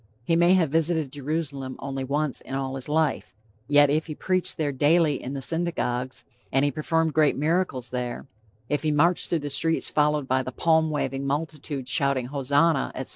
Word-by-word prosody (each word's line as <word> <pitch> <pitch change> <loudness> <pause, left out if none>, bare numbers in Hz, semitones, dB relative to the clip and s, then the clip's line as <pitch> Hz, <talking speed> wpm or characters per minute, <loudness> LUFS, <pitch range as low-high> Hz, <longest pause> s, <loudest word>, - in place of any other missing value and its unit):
He 165 - +1
may 175 +2 +5
have 165 -6 +2
visited 160 -3 +1
Jerusalem 140 -2 -4
only 135 -1 -5
once 145 +1 -2
in 135 - -6
all 135 -1 -3
his 135 +1 -4
life, 155 -4 0 0.3
yet 145 0 +5
if 155 +2 0
he 155 - -6
preached 185 +2 0
there 150 -3 0
daily 150 +1 +2
in 130 - -6
the 135 -1 -5
synagogues; 130 -7 -2 0.3
if 135 +1 +2
he 145 - +2
performed 160 +2 0
great 155 -2 +3
miracles 150 -5 -1
there; 125 -1 -4 0.4
if 145 +1 -1
he 155 - 0
marched 170 +4 +2
through 170 - +1
the 145 - -4
streets 165 +3 +1
followed 150 -2 +1
by 130 0 +2
the 130 - -6
palm 160 +3 +2
waving 135 -2 -2
multitude 145 -2 -3
shouting 140 -2 +1
Hosanna, 140 +3 +1
etc. 130 - -4
145 Hz, 185 wpm, -25 LUFS, 135-160 Hz, 0.4 s, may